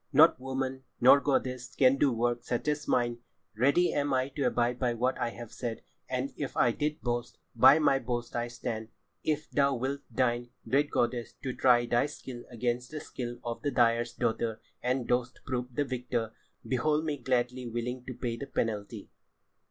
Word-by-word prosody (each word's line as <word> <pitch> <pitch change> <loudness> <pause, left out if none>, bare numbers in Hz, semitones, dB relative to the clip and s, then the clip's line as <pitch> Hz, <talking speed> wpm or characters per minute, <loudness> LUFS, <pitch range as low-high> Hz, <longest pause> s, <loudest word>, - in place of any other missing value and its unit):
"Not 155 0 +6
woman, 130 0 -3 0.2
nor 130 +3 +8
goddess, 130 -3 -1
can 130 0 +5
do 140 -1 +3
work 120 0 0
such 120 +3 -2
as 150 0 -1
mine. 120 -1 +1 0.4
Ready 140 +10 +3
am 145 -1 +1
I 130 +1 +1
to 140 0 -2
abide 120 0 +1
by 120 -2 +1
what 125 +3 +1
I - - 0
have 120 -1 -9
said, 120 -3 -4 0.3
and 130 +1 -2
if 145 - -5
I 120 - +4
did 150 +5 -2
boast, 120 -1 -2 0.2
by 130 +5 +8
my 140 -3 +3
boast 120 -1 -4
I 120 0 0
stand. 115 -2 -4 0.4
If 155 -1 -1
thou 140 -1 +3
wilt 135 +3 -2
deign, 120 0 0 0.2
great 145 +2 +2
goddess, 120 0 0
to 130 - -2
try 120 -2 +4
thy 120 +3 +2
skill 130 -4 -8
against 120 +1 -2
the 155 - -5
skill 120 -4 -6
of 120 -1 -4
the 145 - 0
dyer's 120 -2 +2
daughter 115 -2 -1 0.2
and 125 0 0
dost 125 0 0
prove 125 -1 -3
the 145 - +1
victor, 125 -3 -2 0.4
behold 150 +5 +1
me 150 -2 -1
gladly 125 -1 -1
willing 120 +2 -3
to 130 - -5
pay 115 -2 -3
the 140 - -6
penalty." 105 -3 -3
125 Hz, 185 wpm, -30 LUFS, 120-135 Hz, 0.4 s, nor